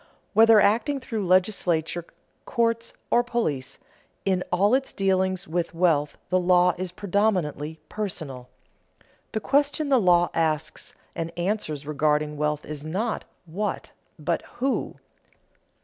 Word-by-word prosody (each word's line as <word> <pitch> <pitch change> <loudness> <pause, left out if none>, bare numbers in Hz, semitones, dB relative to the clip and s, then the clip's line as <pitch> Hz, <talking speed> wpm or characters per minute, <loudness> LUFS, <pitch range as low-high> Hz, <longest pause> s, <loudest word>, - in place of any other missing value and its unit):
Whether 225 0 +7
acting 235 +8 +2
through 220 -7 -3
legislature, 175 -3 +1 0.4
courts, 230 -1 0 0.2
or 240 - +4
police, 225 - -2 0.5
in 185 -2 +1
all 200 +5 +3
its 270 +1 +1
dealings 190 -1 0
with 170 +1 -2
wealth 160 -4 +2
the 185 - +4
law 180 0 +4
is 185 0 -4
predominantly 180 -6 -1
personal. 155 -12 -5 0.8
The 220 - 0
question 285 +3 +1
the 265 -2 +5
law 175 -2 +4
asks 155 -1 -1 0.2
and 165 0 -3
answers 175 -6 -2
regarding 150 0 +1
wealth 150 0 -1
is 150 -1 -7
not 200 +9 -2 0.2
What, 195 +6 -3 0.3
but - - -1 0.2
_Who? 265 +3 -1
180 Hz, 120 wpm, -25 LUFS, 155-215 Hz, 0.8 s, Whether